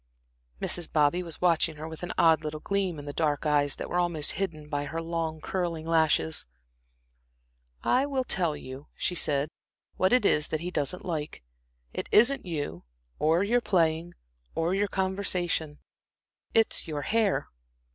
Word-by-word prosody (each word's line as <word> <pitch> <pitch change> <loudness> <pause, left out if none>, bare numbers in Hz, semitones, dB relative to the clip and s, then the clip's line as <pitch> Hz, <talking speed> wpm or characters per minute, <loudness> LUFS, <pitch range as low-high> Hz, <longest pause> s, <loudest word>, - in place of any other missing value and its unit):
Mrs. 175 -2 -2
Bobby 155 +3 +3
was 170 -3 -6
watching 165 -2 +3
her 155 +1 -7
with 160 -1 -9
an 175 - -4
odd 160 -2 +5
little 155 0 -4
gleam 190 -1 -1
in 145 - -8
the 145 - -5
dark 150 -1 0
eyes 145 -1 +2
that - - -5
were 175 - 0
almost 170 -4 +3
hidden 165 -6 -4
by 145 -1 -2
her 160 +3 -4
long, 165 -1 -3
curling 170 -2 -3
lashes. 160 - +2 1.4
"I 265 +3 +2
will 270 -2 0
tell 170 -10 +1
you," 130 +3 -9
she - - -1
said, 145 -4 +1 0.5
"what 185 - +3
it 250 -3 +4
is 150 -4 +3
that 155 - -3
he 175 +1 -4
doesn't 150 +2 -2
like. 155 - -4 0.5
It - - -4
isn't 240 0 +5
you, 145 - -4 0.4
or 165 +4 +3
your 240 +4 +2
playing, 170 -4 +1 0.4
or 165 +2 0
your 200 +1 +1
conversation; 185 -5 0 0.7
it's 225 -5 +2
your 150 -2 -3
hair." 220 -3 +1
165 Hz, 160 wpm, -28 LUFS, 150-185 Hz, 1.4 s, odd